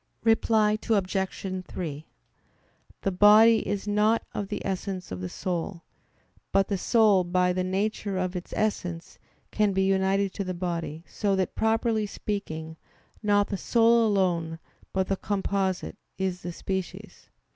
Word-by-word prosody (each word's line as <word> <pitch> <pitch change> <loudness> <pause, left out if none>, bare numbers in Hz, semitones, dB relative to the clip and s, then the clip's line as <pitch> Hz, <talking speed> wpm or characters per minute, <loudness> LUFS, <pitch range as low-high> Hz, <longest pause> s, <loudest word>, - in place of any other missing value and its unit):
Reply 220 -1 +3
Obj. 190 -2 -1
3: 155 -3 -6 1.0
The 195 - +1
body 210 +4 +6
is 205 0 -2
not 210 +2 +2
of 205 - -3
the - - -5
essence 190 - -4
of 90 -1 -5
the 90 - -4
soul; 175 - -4 0.7
but 195 -1 +2
the 200 - 0
soul 215 -5 +4
by 180 +1 +1
the 185 0 -1
nature 195 +1 -1
of 185 0 -2
its 180 - -6
essence 180 -6 -2 0.3
can 210 -2 +2
be 190 0 +2
united 195 0 +1
to 200 - -3
the 185 -1 -4
body, 170 -3 -4
so 200 -2 0
that, 190 -1 -1
properly 220 -1 +1
speaking, 160 -7 -5 0.4
not 205 -1 +2
the 200 - -2
soul 230 +2 +4
alone, 175 -5 0 0.3
but 190 0 0
the 195 0 -1
"composite," 195 -2 -2 0.2
is 185 -2 -2
the 175 - -5
species. 190 +1 -6
195 Hz, 145 wpm, -27 LUFS, 180-210 Hz, 1.0 s, body